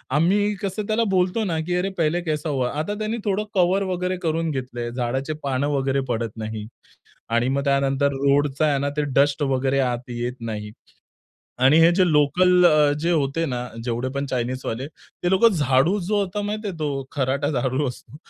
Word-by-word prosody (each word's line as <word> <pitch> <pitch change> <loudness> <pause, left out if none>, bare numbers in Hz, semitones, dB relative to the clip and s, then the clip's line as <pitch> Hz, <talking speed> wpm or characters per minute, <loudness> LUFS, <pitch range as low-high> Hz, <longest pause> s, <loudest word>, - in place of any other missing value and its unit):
आम्ही 205 +6 +2
कसं 200 +1 -3
त्याला 220 +1 +1
बोलतो 185 +4 +1
ना 165 -5 -1
की 180 - 0
अरे 185 +2 0
पहिले 165 +2 +1
कैसा 155 -1 -2
हुआ? 130 -3 0
आता 185 +7 -2
त्याने 215 +2 -2
थोडं 205 +1 0
कव्हर 185 +2 +3
वगैरे 185 0 -2
करून 165 0 0
घेतलंय, 120 -3 -4
झाडाची 130 +4 -2
पानं 135 +1 0
वगैरे 135 -1 0
पडत 115 -2 -2
नाहीत. 110 -1 -5 0.6
आणि 115 +2 +1
मग 140 +1 0
त्यानंतर 140 0 +1
रोडचा 140 +2 +1
आहे 140 -2 +2
ना 140 +1 -1
ते 150 - +2
डस्ट 140 +2 +3
वगैरे 135 0 +1
आत 125 +1 -4
येत 120 +1 -3
नाही. 105 -2 -5 0.9
आणि 135 +5 +5
हे 165 +1 +7
जे 185 -1 +4
लोकल 180 +5 +4
अ, 150 -3 +4
जे 170 +2 0
होते 155 +2 0
ना, 125 -2 -3 0.2
जेवढे 120 +1 -2
पण 140 0 -2
चायनीजवाले 125 0 -3
ते 175 +2 -6
लोकं 190 +5 +5
झाडू 145 +5 +2
जो 205 +3 0
होता, 200 +1 -2
माहिती 210 +1 -3
आहे 180 - -5
तो 140 -3 -2
खराटा 140 +2 0
झाडू 130 +1 0
असतो, 125 +3 -10
145 Hz, 185 wpm, -23 LUFS, 130-180 Hz, 0.9 s, हे